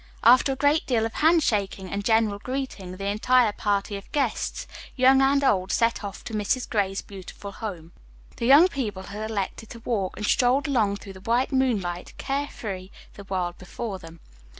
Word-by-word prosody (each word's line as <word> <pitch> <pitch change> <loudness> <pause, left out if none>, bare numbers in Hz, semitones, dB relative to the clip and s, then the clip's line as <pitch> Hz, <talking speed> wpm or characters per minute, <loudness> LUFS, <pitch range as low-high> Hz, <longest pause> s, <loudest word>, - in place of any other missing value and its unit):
After 255 +4 +6
a - - -5
great 290 +3 +2
deal 230 -4 +2
of 225 - -4
handshaking 215 - +2
and 200 0 -2
general 220 -2 +2
greeting, 240 -8 -5
the 195 - -5
entire 220 +3 +3
party 205 0 -1
of 200 - -13
guests, 275 -6 -1 0.3
young 265 +1 +5
and 275 +1 +3
old, 190 -7 +2
set 230 0 +1
off 200 -1 -7
for 225 - -7
Mrs. 215 +4 0
Gray's 195 -3 -1
beautiful 200 +1 -9
home. 180 -6 -7 0.5
The 235 - -1
young 290 +7 +8
people 220 - -4
had 210 +3 -6
elected 215 +1 -4
to 235 - -9
walk 205 -6 -2
and 210 - -3
strolled 255 +7 +3
along 220 -8 +2
through 200 -1 -10
the 190 - -13
white 235 +5 +1
moonlight, 210 -10 -1
care 280 +1 -2
free, 190 -6 -7 0.2
the 200 - -11
world 180 -2 -3
before 195 +2 -6
them. 165 -1 -13
215 Hz, 180 wpm, -25 LUFS, 195-255 Hz, 0.5 s, young